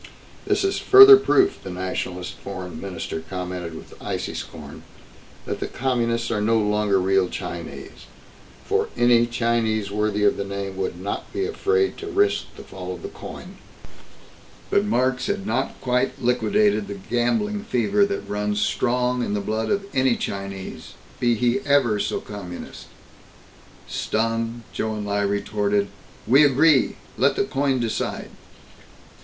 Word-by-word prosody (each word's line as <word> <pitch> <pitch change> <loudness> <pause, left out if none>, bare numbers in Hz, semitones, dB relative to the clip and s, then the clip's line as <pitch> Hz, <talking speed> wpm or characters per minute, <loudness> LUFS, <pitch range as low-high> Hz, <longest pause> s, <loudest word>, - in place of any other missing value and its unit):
"This - - +2
is 390 0 0
further 400 +1 +10
proof," 390 -1 +2
the - - -8
Nationalist 90 0 -4
Foreign 95 -3 -7
Minister 90 -4 -5
commented 90 -3 -5
with - - -11
icy - - -3
scorn, - - -8 0.6
"that - - -4
the - - -3
Communists 120 -2 -1
are 105 -2 0
no 115 +2 +3
longer 105 -2 +2
real 95 0 +2
Chinese. - - -7 0.6
For - - 0
any 120 -1 +4
Chinese 115 -3 0
worthy 105 0 0
of 105 - +3
the - - -2
name 100 -1 -5
would 95 -2 -3
not 100 +2 -5
be 390 +1 -1
afraid 410 -1 0
to 410 - -6
risk 405 +1 +1
the - - -10
fall - - -7
of - - -13
the 400 - -5
coin." - - -10 1.1
But 200 - +3
Marx 130 - +1
had 200 -1 -2
not - - -2
quite 125 0 0
liquidated 125 - +2
the 100 - -5
gambling 205 - -1
fever 125 - +2
that 200 0 -2
runs 105 0 -1
strong 125 +2 +1
in 105 - -2
the - - 0
blood 110 +2 -2
of 200 -1 0
any 130 -2 +3
Chinese, 95 -6 -6 0.3
be 120 -1 +2
he 120 +3 +1
ever 135 -6 +2
so 100 - -1
Communist. 95 -4 -9 1.0
Stung, 115 +1 -2
Chou 110 0 -2
En 105 -1 -4
Lai 100 0 0
retorted: 100 0 0 0.4
"We 135 +6 +6
agree! 145 -1 +4 0.2
Let - - +3
the - - +1
coin 135 -1 0
decide!" 115 -2 -3
115 Hz, 150 wpm, -23 LUFS, 100-135 Hz, 1.1 s, further